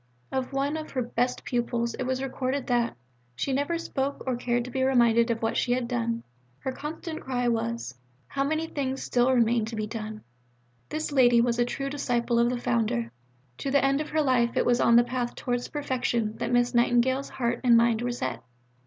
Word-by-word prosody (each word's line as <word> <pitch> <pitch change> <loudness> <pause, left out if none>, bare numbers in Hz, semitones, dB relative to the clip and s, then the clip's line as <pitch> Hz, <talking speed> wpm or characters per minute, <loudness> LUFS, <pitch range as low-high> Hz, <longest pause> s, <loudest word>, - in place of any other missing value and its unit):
'" - - -39
Of 265 0 -2
one 280 +3 0
of 310 0 -6
her 255 -2 -1
best 245 +1 -1
pupils 235 -1 -1
it 260 - -4
was 260 +1 -1
recorded 265 0 -2
that 240 -2 +1 0.4
"she 265 - -1
never 285 +5 0
spoke 280 -4 -3
or 260 -2 0
cared 240 0 -1
to 250 - -7
be 260 - -1
reminded 235 -3 +4
of 230 -1 -1
what 225 - 0
she 245 - +1
had 250 -1 -1
done; 235 -1 -1 0.3
her 265 - -4
constant 315 +3 -6
cry 245 -2 -1
was 115 - -1 0.3
'How 275 - -2
many 310 +3 0
things 270 -4 -3
still 245 +1 +2
remain 235 -2 +3
to 225 +1 -6
be 215 -1 -2
done.'" 215 -1 -6 0.7
This 310 0 -3
lady 245 -4 +5
was 235 0 +2
a 240 - +4
true 275 +3 -3
disciple 240 -4 0
of 235 0 +4
the 250 - -1
Founder. 215 - 0 0.5
To 275 - -2
the 275 0 +3
end 275 +2 +2
of 305 - -5
her 310 0 +1
life 245 -3 +2
it - - +3
was 245 0 +3
on 235 - +5
the 240 - +7
path 245 -1 -3
towards 245 -1 -2
perfection 245 -6 -1
that - - -2
Miss 245 0 +2
Nightingale's 245 +3 +2
heart 235 -1 -2
and 240 -2 +6
mind 230 -1 +3
were 245 0 -1
set. 240 - -3
245 Hz, 210 wpm, -27 LUFS, 235-265 Hz, 0.7 s, the